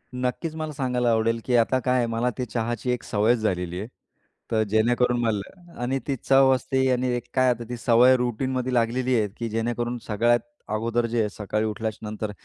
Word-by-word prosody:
नक्कीच. 125 Hz, +6 st, -2 dB
मला 155 Hz, -1 st, -4 dB
सांगायला 125 Hz, -3 st, 0 dB
आवडेल 115 Hz, +1 st, +1 dB
की, 125 Hz, -, +1 dB
आता 120 Hz, +3 st, +3 dB
काय 125 Hz, -1 st, +2 dB
मला 115 Hz, +2 st, 0 dB
ते 125 Hz, -, -2 dB
चहाची 120 Hz, +2 st, -2 dB
एक 125 Hz, -, -2 dB
सवयच 110 Hz, +3 st, +2 dB
झालेली 90 Hz, -4 st, -2 dB
आहे, 105 Hz, -, -5 dB, 0.6 s
तर 110 Hz, -1 st, +2 dB
जेणेकरून 120 Hz, +3 st, +2 dB
मला 115 Hz, -, -4 dB
आणि 135 Hz, +2 st, 0 dB
ती 140 Hz, -, 0 dB
चव 135 Hz, 0 st, +5 dB
असते 130 Hz, +1 st, 0 dB
आणि 125 Hz, +1 st, +1 dB
एक 120 Hz, -, -3 dB
काय 130 Hz, -1 st, +3 dB
आता 120 Hz, -1 st, -1 dB
ती 120 Hz, -, -4 dB
सवय 120 Hz, +3 st, +5 dB
रूटीनमध्ये 125 Hz, +1 st, -1 dB
लागलेली 125 Hz, +2 st, +1 dB
आहे, 105 Hz, -, +1 dB
की 115 Hz, -1 st, -3 dB
जेणेकरून 120 Hz, +2 st, -2 dB
सगळ्यात 120 Hz, +3 st, +3 dB, 0.3 s
अगोदर 115 Hz, +2 st, 0 dB
जे 115 Hz, 0 st, -1 dB
आहे, 105 Hz, -1 st, +1 dB
सकाळी 105 Hz, +1 st, -2 dB
उठल्याच्यानंतर, 110 Hz, 0 st, -4 dB
120 Hz, 185 wpm, -25 LUFS, 110-125 Hz, 0.6 s, चव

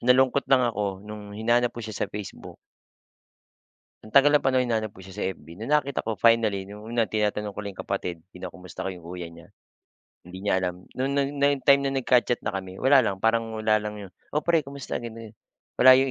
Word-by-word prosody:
Nalungkot 130 Hz, +2 st, +4 dB
lang 130 Hz, -2 st, +5 dB
ako 100 Hz, -4 st, -2 dB
nung 105 Hz, -1 st, -9 dB
hinanap 120 Hz, +3 st, +2 dB
ko 120 Hz, -, -5 dB
siya 110 Hz, -, -6 dB
sa -, -, -2 dB
Facebook. 105 Hz, -1 st, -8 dB, 1.5 s
Ang 110 Hz, -, -14 dB
tagal 140 Hz, +1 st, +7 dB
ng 150 Hz, -, +6 dB
panahon 130 Hz, -1 st, +3 dB
hinanap 110 Hz, -4 st, -1 dB
ko 95 Hz, -, -13 dB
siya 95 Hz, -, -12 dB
sa -, -, -1 dB
FB 85 Hz, +2 st, -14 dB
nung 115 Hz, +8 st, 0 dB
nakita 140 Hz, -5 st, 0 dB
ko 110 Hz, -, 0 dB
finally 110 Hz, -3 st, +3 dB
nung 105 Hz, +2 st, -11 dB
una 115 Hz, +1 st, +1 dB
tinatanong 105 Hz, -1 st, 0 dB
ko 100 Hz, -, -12 dB
lang 100 Hz, -2 st, -5 dB
'yong -, -, -6 dB
kapatid, 90 Hz, -1 st, -3 dB
kinukumusta 90 Hz, -1 st, -8 dB
ko -, -, -1 dB
'yong 90 Hz, -, -13 dB
kuya 90 Hz, 0 st, -6 dB
niya. 85 Hz, 0 st, -13 dB, 0.8 s
HIndi 90 Hz, +1 st, -9 dB
niya 100 Hz, -, +1 dB
alam 90 Hz, -1 st, -1 dB, 0.2 s
no 130 Hz, -, 0 dB
no 140 Hz, +1 st, +1 dB
nung 140 Hz, 0 st, +1 dB
time 140 Hz, -1 st, +5 dB
na 135 Hz, -, 0 dB
nagka-chat 125 Hz, -2 st, +2 dB
na -, -, -2 dB
kami 95 Hz, -2 st, -6 dB
wala 135 Hz, +1 st, +6 dB
lang 95 Hz, -2 st, -2 dB
parang 115 Hz, 0 st, +1 dB
wala 110 Hz, 0 st, +3 dB
lang 105 Hz, 0 st, -5 dB
'yon, 95 Hz, -3 st, -9 dB, 0.2 s
"Oh, 150 Hz, -, +3 dB
pre 165 Hz, -3 st, +2 dB
kumusta?" 140 Hz, -1 st, -5 dB
ganun-ganon, 115 Hz, -2 st, -9 dB, 0.4 s
wala 130 Hz, +1 st, +9 dB
'yong 135 Hz, +1 st, +3 dB
110 Hz, 210 wpm, -26 LUFS, 100-130 Hz, 1.5 s, wala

